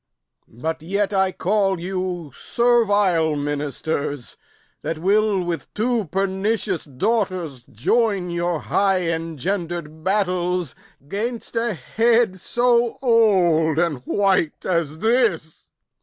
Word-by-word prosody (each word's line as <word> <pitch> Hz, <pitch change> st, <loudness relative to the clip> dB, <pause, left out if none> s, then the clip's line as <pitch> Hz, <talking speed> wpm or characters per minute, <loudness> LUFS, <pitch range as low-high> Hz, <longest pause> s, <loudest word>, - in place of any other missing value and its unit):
But 160 Hz, +7 st, -4 dB
yet 200 Hz, +4 st, -1 dB
I 190 Hz, -1 st, +2 dB
call 195 Hz, -1 st, 0 dB
you 180 Hz, -3 st, -4 dB
servile 205 Hz, -, +2 dB
ministers, 145 Hz, -1 st, -3 dB, 0.5 s
That 165 Hz, -, -3 dB
will 200 Hz, +2 st, +2 dB
with 175 Hz, -1 st, -4 dB
two 230 Hz, 0 st, 0 dB
pernicious 195 Hz, +2 st, -1 dB
daughters 175 Hz, -, -2 dB
join 195 Hz, -, +1 dB
Your 170 Hz, -1 st, -1 dB
high 190 Hz, -4 st, +1 dB
engender'd 165 Hz, 0 st, -4 dB
battles 180 Hz, -4 st, 0 dB, 0.3 s
'gainst 230 Hz, +7 st, -4 dB
a 230 Hz, -2 st, 0 dB
head 225 Hz, -, +1 dB
So 240 Hz, +3 st, +1 dB
old 180 Hz, -, +3 dB
and 165 Hz, -4 st, +1 dB
white 190 Hz, -6 st, +1 dB
as 170 Hz, -4 st, 0 dB
this! 220 Hz, -7 st, 0 dB
185 Hz, 100 wpm, -22 LUFS, 160-210 Hz, 0.5 s, old